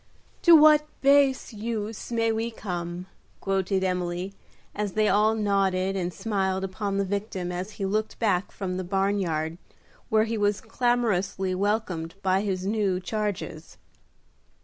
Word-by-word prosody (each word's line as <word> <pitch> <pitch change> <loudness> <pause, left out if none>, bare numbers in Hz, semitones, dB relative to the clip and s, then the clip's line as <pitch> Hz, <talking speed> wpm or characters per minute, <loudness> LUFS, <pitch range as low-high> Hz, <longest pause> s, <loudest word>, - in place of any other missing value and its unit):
"To 340 -2 +8
what 300 -1 +7
base 275 -2 +4
uses 220 0 -4
may 230 -1 +2
we 225 +1 -1
come," 175 -5 -5 0.3
quoted 195 0 0
Emily, 180 0 -2 0.4
as 205 -2 -3
they 215 0 +2
all 215 +2 +3
nodded 195 -2 +1
and 180 -2 -1
smiled 190 -2 -1
upon 195 +1 -2
the 200 - +1
victim 195 -2 -3
as 185 +4 -5
he 195 - -4
looked 215 +3 -1
back 200 -5 +1
from 185 -2 -4
the 185 - -2
barn 195 +2 0
yard, 160 -2 -2 0.5
where 220 0 +4
he 225 0 -2
was 205 -1 +1
clamorously 220 -6 0
welcomed 185 -4 -1
by 190 0 +2
his 190 -3 -2
new 200 -3 +1
charges. 190 -5 -4
200 Hz, 145 wpm, -26 LUFS, 185-220 Hz, 0.5 s, To